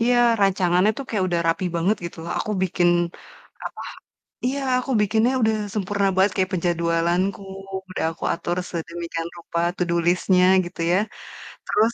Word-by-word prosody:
Iya, 245 Hz, +1 st, +3 dB, 0.2 s
rancangannya 185 Hz, 0 st, +3 dB
tuh 275 Hz, -, -4 dB
kayak 200 Hz, -4 st, 0 dB
udah 170 Hz, -1 st, 0 dB
rapi 165 Hz, +3 st, 0 dB
banget 190 Hz, +6 st, +2 dB
gitu 170 Hz, -, -6 dB
loh. 170 Hz, -, -6 dB
Aku 215 Hz, -, -3 dB
bikin 175 Hz, -1 st, +2 dB, 0.8 s
apa, -, -, -6 dB, 0.6 s
iya, 275 Hz, +3 st, 0 dB, 0.2 s
aku 265 Hz, +1 st, -4 dB
bikinnya 220 Hz, +4 st, +2 dB
udah 220 Hz, 0 st, +3 dB, 0.2 s
sempurna 200 Hz, -1 st, 0 dB
banget 190 Hz, +1 st, +4 dB
kayak 190 Hz, +1 st, +1 dB
penjadwalanku, 170 Hz, +3 st, 0 dB, 0.5 s
udah 185 Hz, -, -3 dB
aku 165 Hz, -, -11 dB
atur 175 Hz, +1 st, -3 dB
sedemikian 170 Hz, 0 st, -4 dB
rupa, 170 Hz, 0 st, -4 dB, 0.2 s
to -, -, -7 dB
do 170 Hz, -, +1 dB
list-nya, 180 Hz, +1 st, +3 dB, 0.2 s
gitu 175 Hz, -1 st, -7 dB
ya. 180 Hz, -, +4 dB, 0.7 s
Terus, 220 Hz, +3 st, +2 dB
185 Hz, 155 wpm, -23 LUFS, 170-205 Hz, 0.8 s, banget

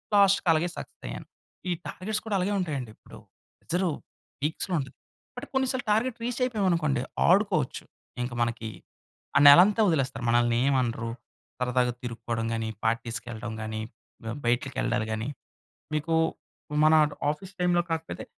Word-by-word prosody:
లాస్ట్‌కి 200 Hz, -2 st, +5 dB
అలాగే 160 Hz, +3 st, +1 dB
సక్సెస్ -, -, -9 dB
అయ్యాను. -, -, -7 dB, 0.4 s
ఈ -, -, +1 dB
టార్గెట్స్ 210 Hz, +3 st, -3 dB
కూడా 215 Hz, -2 st, -1 dB
అలాగే 190 Hz, +3 st, 0 dB
ఉంటాయండి 145 Hz, -9 st, -3 dB
ఇప్పుడు. -, -, -15 dB, 0.4 s
ప్రెజరు 180 Hz, +1 st, 0 dB, 0.5 s
పీక్స్‌లో 160 Hz, +5 st, -2 dB
ఉంటది. 135 Hz, -1 st, -6 dB, 0.4 s
బట్, -, -, -6 dB
కొన్ని 265 Hz, 0 st, +2 dB
సార్లు 260 Hz, -2 st, -3 dB
టార్గెట్ 230 Hz, +3 st, +1 dB
రీచ్ 245 Hz, 0 st, -2 dB
అయిపోయాం 215 Hz, -6 st, 0 dB
అనుకోండి, 155 Hz, -7 st, +1 dB, 0.3 s
ఆడుకోవచ్చు. 180 Hz, -7 st, +2 dB, 0.4 s
ఇంకా 120 Hz, 0 st, -4 dB
మనకి 115 Hz, -1 st, -3 dB, 0.7 s
ఆ -, -, +7 dB
నెలంతా 185 Hz, +10 st, +8 dB
వదిలేస్తారు. 135 Hz, -8 st, 0 dB
మనల్ని 120 Hz, 0 st, +3 dB
ఏం 140 Hz, 0 st, +3 dB
అనరు. 115 Hz, -1 st, -2 dB, 0.5 s
సరదాగా 125 Hz, 0 st, +1 dB
తిరుక్కోవడం 115 Hz, -1 st, -3 dB
గాని, 115 Hz, -1 st, -2 dB
పార్టీస్‌కెళ్ళడం 115 Hz, 0 st, -2 dB
గానీ, 110 Hz, 0 st, -4 dB, 0.4 s
బ 115 Hz, -, -4 dB
బయట్లకెళ్డాలు 120 Hz, -1 st, 0 dB
గానీ. 110 Hz, +2 st, -2 dB, 0.7 s
మీకూ 155 Hz, +2 st, 0 dB, 0.7 s
మన 155 Hz, -, +6 dB, 0.4 s
ఆఫీస్ 180 Hz, +6 st, -6 dB
టైమ్‌లో 175 Hz, -1 st, +3 dB
కాకపోతే, 160 Hz, -, -3 dB
140 Hz, 135 wpm, -27 LUFS, 115-185 Hz, 0.7 s, నెలంతా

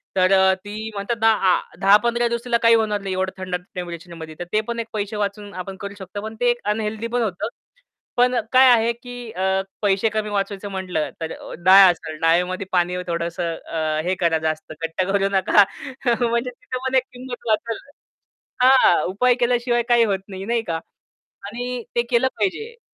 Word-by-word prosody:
तर 185 Hz, 0 st, +3 dB
अ, 190 Hz, 0 st, +5 dB
ती 215 Hz, +2 st, -5 dB
म्हणतात 205 Hz, +4 st, -3 dB
ना 225 Hz, -, +6 dB, 0.2 s
आ -, -, +3 dB, 0.2 s
10-15 235 Hz, +5 st, +4 dB
दिवस 235 Hz, 0 st, -2 dB
तिला 240 Hz, -1 st, +2 dB
काही 230 Hz, 0 st, +7 dB
होणार 215 Hz, -2 st, 0 dB
नाही 195 Hz, -1 st, -3 dB
एवढं 185 Hz, 0 st, -1 dB
थंड 185 Hz, -1 st, -3 dB, 0.2 s
टेम्परेचरमध्ये. 170 Hz, -2 st, -7 dB
तर -, -, -3 dB
ते 215 Hz, -, +3 dB
पण 235 Hz, 0 st, -3 dB
एक 230 Hz, -, -3 dB
पैसे 210 Hz, 0 st, -3 dB
वाचून 205 Hz, 0 st, -3 dB
आपण 190 Hz, +1 st, -6 dB
करू 200 Hz, 0 st, -5 dB
शकतो. 190 Hz, +2 st, -7 dB
पण 220 Hz, +1 st, -7 dB
ते 245 Hz, 0 st, +3 dB
एक 240 Hz, -, +2 dB, 0.2 s
अनहेल्दी 220 Hz, +1 st, -3 dB
पण 240 Hz, +1 st, -1 dB
होतं. 195 Hz, -5 st, -2 dB, 0.7 s
पण 250 Hz, +1 st, +4 dB, 0.2 s
काय 260 Hz, 0 st, +7 dB
आहे 230 Hz, 0 st, +4 dB
की 245 Hz, -1 st, -9 dB
अ, 190 Hz, +1 st, 0 dB, 0.2 s
पैसे 200 Hz, +2 st, +2 dB
कमी 215 Hz, 0 st, -2 dB
वाचवायचं 200 Hz, 0 st, -3 dB
म्हटलं, 185 Hz, -5 st, -2 dB
तर 160 Hz, -, -3 dB, 0.3 s
डाळ 190 Hz, 0 st, +9 dB
असेल 160 Hz, -2 st, -7 dB
डाळमध्ये 180 Hz, +4 st, +2 dB
पाणी 180 Hz, 0 st, +1 dB
थोडंसं 170 Hz, 0 st, -2 dB
अ, 155 Hz, -2 st, -2 dB
हे 185 Hz, +2 st, 0 dB
करा. 165 Hz, -2 st, +2 dB
जास्त 155 Hz, 0 st, -3 dB
घट्ट 165 Hz, +3 st, -2 dB
करू 195 Hz, 0 st, +1 dB
नका 195 Hz, +1 st, +5 dB, 0.7 s
म्हणजे 235 Hz, +2 st, 0 dB
तिथे 250 Hz, +1 st, -7 dB
पण 260 Hz, -, -1 dB
एक 260 Hz, -, +4 dB
किंमत 250 Hz, -1 st, -8 dB
वाचल 225 Hz, +1 st, 0 dB, 0.9 s
हां, 255 Hz, -10 st, +6 dB
उपाय 245 Hz, +6 st, +3 dB
केल्याशिवाय 240 Hz, -1 st, +1 dB
काही 240 Hz, -1 st, +5 dB
होत 195 Hz, -2 st, 0 dB
नाही 190 Hz, 0 st, -7 dB
नाही 235 Hz, +1 st, 0 dB
का. 165 Hz, -1 st, -1 dB, 0.7 s
आणि 245 Hz, +3 st, -5 dB
ते 240 Hz, -, +3 dB
केलं 245 Hz, +2 st, +3 dB
पाहिजे. 440 Hz, -, -2 dB
205 Hz, 185 wpm, -22 LUFS, 185-235 Hz, 0.9 s, डाळ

